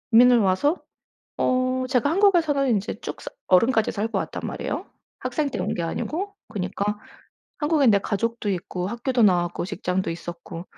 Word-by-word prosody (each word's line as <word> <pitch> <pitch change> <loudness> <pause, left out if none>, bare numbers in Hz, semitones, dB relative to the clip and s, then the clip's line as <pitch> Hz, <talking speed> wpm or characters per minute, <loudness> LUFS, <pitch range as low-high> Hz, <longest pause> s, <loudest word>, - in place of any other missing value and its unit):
이민을 245 +1 +7
와서 215 - +2 0.6
어 255 0 +1
제가 255 +1 +2
한국에서는 325 -7 +3
인제 210 -3 -1
쭉 - - -6
사 - - -6 0.2
어른까지 220 +4 +4
살고 220 +2 -2
왔단 - - -3
말이에요, - - -4 0.3
학생 300 -3 -1
때 - - -4
온 - - -1
게 170 - -2
아니고. 355 - -3
그니까 205 0 -3 0.6
한국엔 295 -5 +3
내 200 - +5
가족도 225 +2 -2
있고, 180 -1 -3
학교도 240 +3 0
나왔고, 175 -5 +2
직장도 190 -1 -2
있었고 170 0 -7
225 Hz, 340 characters per minute, -24 LUFS, 190-270 Hz, 0.6 s, 이민을